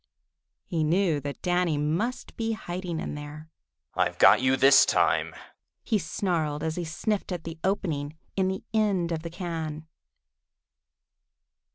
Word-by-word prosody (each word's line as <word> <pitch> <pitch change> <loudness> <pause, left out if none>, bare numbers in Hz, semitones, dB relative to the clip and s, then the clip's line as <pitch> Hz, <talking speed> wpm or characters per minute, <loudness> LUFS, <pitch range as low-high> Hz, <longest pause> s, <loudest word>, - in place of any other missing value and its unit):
He 160 -2 -1
knew 165 -1 +2
that 145 0 -7
Danny 175 -3 +1
must 165 +12 -2
be 225 0 -1
hiding 175 -4 -4
in - - -4
there. 150 +2 -9 0.4
"I've - - 0
got - - +7
you 130 +1 +3
this 135 +1 +7
time!" - - +2 0.5
he 220 -3 +1
snarled, 160 -6 -1
as 160 0 -1
he 175 - -3
sniffed 195 +6 -2
at 175 -3 -4
the 165 0 -7
opening 160 -6 -1 0.2
in 190 -1 +2
the 190 0 -3
end 200 -6 +1
of 160 -1 -2
the 170 - -6
can. 165 -3 -5
165 Hz, 145 wpm, -27 LUFS, 155-185 Hz, 0.5 s, got